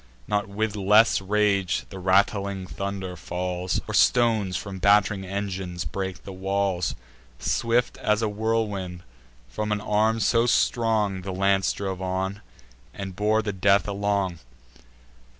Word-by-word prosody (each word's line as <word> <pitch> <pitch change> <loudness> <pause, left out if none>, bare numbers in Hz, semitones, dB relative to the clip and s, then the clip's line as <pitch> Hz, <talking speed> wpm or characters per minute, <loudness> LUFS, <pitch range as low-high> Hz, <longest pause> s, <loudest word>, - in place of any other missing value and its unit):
Not 105 -1 -1
with 110 +1 -2
less 105 +2 +4
rage 100 -2 +1
the 95 - -8
rattling 100 +1 +1
thunder 95 -1 -5
falls, 90 +1 -3
Or - - -4
stones 110 -7 +3
from 95 -1 -6
batt'ring 100 0 +3
engines 95 -3 -4
break 95 +1 -4
the 95 - -8
walls: 95 -4 -1 0.4
Swift 120 - 0
as 105 +1 +1
a - - +2
whirlwind, 105 -4 -2 0.4
from 105 - -3
an 105 - +1
arm 110 +2 +1
so 115 +2 +3
strong, 110 -5 +1
The 95 +1 -5
lance 95 +1 +2
drove 95 -2 -4
on, 95 +2 -2 0.5
and 95 -2 -6
bore 110 +2 +1
the 105 -1 -2
death 100 +2 +3
along. 100 -3 -1
100 Hz, 135 wpm, -25 LUFS, 95-105 Hz, 0.5 s, less